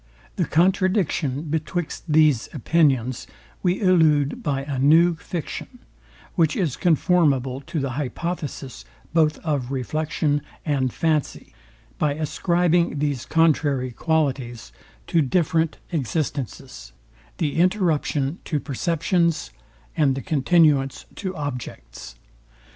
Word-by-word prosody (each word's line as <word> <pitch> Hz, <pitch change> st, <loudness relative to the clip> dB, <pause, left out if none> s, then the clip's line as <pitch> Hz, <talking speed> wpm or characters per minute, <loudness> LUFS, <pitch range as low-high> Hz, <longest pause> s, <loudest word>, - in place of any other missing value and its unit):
The -, -, 0 dB
contradiction 180 Hz, -5 st, +1 dB
betwixt 160 Hz, +2 st, -3 dB
these 150 Hz, -6 st, +3 dB
opinions 130 Hz, -4 st, +1 dB, 0.3 s
we 180 Hz, 0 st, +1 dB
elude 160 Hz, -7 st, +3 dB
by 135 Hz, -2 st, -1 dB
a 140 Hz, -2 st, -4 dB
new 165 Hz, +6 st, +5 dB
fiction, 170 Hz, -, -6 dB, 0.6 s
which 160 Hz, -5 st, +2 dB
is 165 Hz, -10 st, 0 dB
conformable 145 Hz, -6 st, +2 dB
to 165 Hz, -1 st, -2 dB
the 135 Hz, -2 st, -2 dB
hypotheses 145 Hz, 0 st, -4 dB, 0.3 s
both 155 Hz, -2 st, +3 dB
of 140 Hz, -6 st, -1 dB
reflection 145 Hz, +2 st, -1 dB, 0.2 s
and 135 Hz, -5 st, 0 dB
fancy, 155 Hz, 0 st, -1 dB, 0.5 s
by 145 Hz, -2 st, +1 dB
ascribing 170 Hz, +1 st, +1 dB
these 140 Hz, -4 st, -2 dB
contrary 145 Hz, -5 st, +2 dB
qualities 130 Hz, -, -1 dB, 0.3 s
to 165 Hz, -, +2 dB
different 160 Hz, +2 st, +1 dB
existences; 135 Hz, -, -4 dB, 0.4 s
the 150 Hz, -2 st, -1 dB
interruption 170 Hz, -5 st, +1 dB
to 150 Hz, -, -1 dB
perceptions, 170 Hz, -, 0 dB, 0.4 s
and 140 Hz, -4 st, +2 dB
the 135 Hz, -, -5 dB
continuance 150 Hz, -3 st, +2 dB
to 190 Hz, -2 st, -5 dB
objects. 125 Hz, -, -7 dB
150 Hz, 105 wpm, -23 LUFS, 135-170 Hz, 0.6 s, new